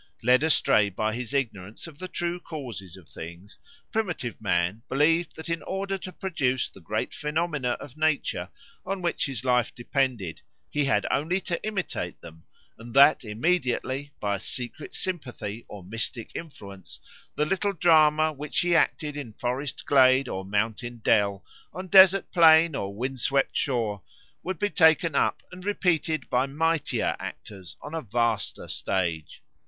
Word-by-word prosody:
Led 125 +3 +5
astray 145 -9 +4
by 110 +3 -2
his 120 -1 -5
ignorance 110 -7 -3
of 160 -3 -12
the 185 - -5
true 175 -1 -2
causes 120 - -7
of 90 -4 -16
things, 85 +7 -10 0.3
primitive 175 - -2
man 90 +1 0
believed 160 +5 +2
that 160 - -8
in 165 0 -2
order 195 +1 -3
to 185 -1 -7
produce 140 -9 -1
the - - -16
great 110 +6 -3
phenomena 150 -4 -1
of 140 -2 -9
nature 155 -2 0 0.3
on 190 0 -4
which 170 - 0
his 130 -2 -5
life 125 -1 +2
depended 120 - -1 0.3
he 145 -1 +1
had 135 - +2
only 165 +7 +1
to 175 -2 -3
imitate 190 - -3
them, 80 -1 -13 0.4
and 115 +1 -10
that 140 +1 +7
immediately 130 +3 -1
by 100 -1 -1
a - - -11
secret 125 +8 -6
sympathy 120 - -4
or 100 -3 -10
mystic 115 +4 -3
influence 100 - -9 0.4
the 150 - +1
little 195 +4 0
drama 155 -2 +4
which 150 +1 -2
he 175 -1 +2
acted 150 -2 +1
in 135 -7 -6
forest 125 +5 -3
glade 130 -1 +5
or 95 -4 -4
mountain 110 +4 -2
dell, 100 -2 +2 0.3
on 185 +4 -6
desert 190 0 +7
plain 165 -1 +6
or 100 -6 -3
wind 130 +4 -3
swept 140 +2 +1
shore, 115 -7 -1 0.4
would 185 0 -4
be 205 +4 -1
taken 160 +1 +4
up - - +1
and 185 0 -10
repeated 165 -7 0
by 125 +2 +1
mightier 160 +2 0
actors 95 -6 -9
on 145 - -8
a 165 - -2
vaster 115 -2 -1
stage. 85 -5 -2
135 Hz, 155 wpm, -26 LUFS, 110-165 Hz, 0.4 s, that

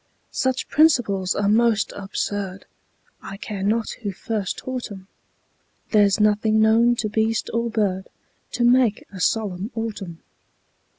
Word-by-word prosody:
Such 260 -1 -1
principles 225 - +3
are 205 - 0
most 220 0 +2
absurd, 200 -1 -4 0.6
I 195 - -8
care 200 -1 -6
not 215 +3 0
who 205 -3 -3
first 200 0 -3
taught 255 -3 -5
'em; 190 -2 -9 0.9
There's 205 -1 +4
nothing 215 +1 +3
known 225 +2 +4
to 225 - -2
beast 220 +1 0
or 235 0 0
bird 200 -4 -1 0.4
To 245 - 0
make 240 -3 +3
a 190 - -8
solemn 200 -1 -1
autumn. 205 -7 -5
215 Hz, 130 wpm, -23 LUFS, 200-230 Hz, 0.9 s, There's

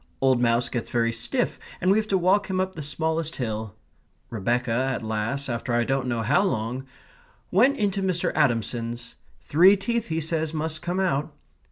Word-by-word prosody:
Old 130 -2 +3
Mouse 120 0 +2
gets 120 - -4
very 115 -1 +1
stiff, - - -1 0.2
and 185 - +2
we 205 - +4
have 215 - -3
to 195 - +2
walk 190 +3 +2
him 185 0 0
up 190 0 -1
the 160 - -7
smallest 160 +2 -1
hill. 110 -4 -4 0.6
Rebecca, 120 +3 0
at 130 +1 0
last, 110 +6 -2
after 120 0 -2
I 120 - +3
don't 135 +1 -1
know 120 -2 -1
how 110 - +3
long, 130 - -2 0.6
went 255 +9 +4
into 200 -1 0
Mr. 180 -2 0
Adamson's. 120 -3 -1 0.3
Three 185 +7 +5
teeth, 235 +3 -2
he 160 0 -1
says, 160 0 -2
must 155 0 -2
come 175 +2 -2
out. 160 -5 0
145 Hz, 180 wpm, -25 LUFS, 120-185 Hz, 0.6 s, Three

